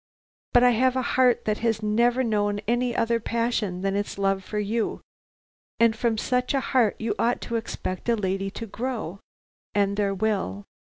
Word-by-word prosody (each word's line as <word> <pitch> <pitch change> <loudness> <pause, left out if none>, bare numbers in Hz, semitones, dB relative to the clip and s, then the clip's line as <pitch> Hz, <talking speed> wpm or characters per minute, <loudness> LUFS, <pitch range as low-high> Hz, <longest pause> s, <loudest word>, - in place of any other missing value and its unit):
But 245 - +6
I 250 - +6
have 255 +2 +2
a 260 - 0
heart 250 -2 +3
that 215 0 0
has 225 -2 0
never 235 +4 +2
known 205 -3 +1
any 240 +1 +1
other 230 0 +1
passion 230 -5 -1
than 195 0 0
its 205 0 -2
love 195 -1 +1
for 210 - -5
you, 210 +2 -1 0.8
and 230 -1 +4
from 230 -1 0
such 250 +4 0
a - - +3
heart 235 -5 +4
you 225 -1 -1
ought 240 +1 +2
to 235 - -4
expect 225 -2 -4
a 235 - +4
lady 195 -1 -1
to 230 +4 -7
grow, 225 -4 -4 0.6
and 200 0 +2
there 200 -1 +1
will. 190 - -1
220 Hz, 180 wpm, -25 LUFS, 200-240 Hz, 0.8 s, But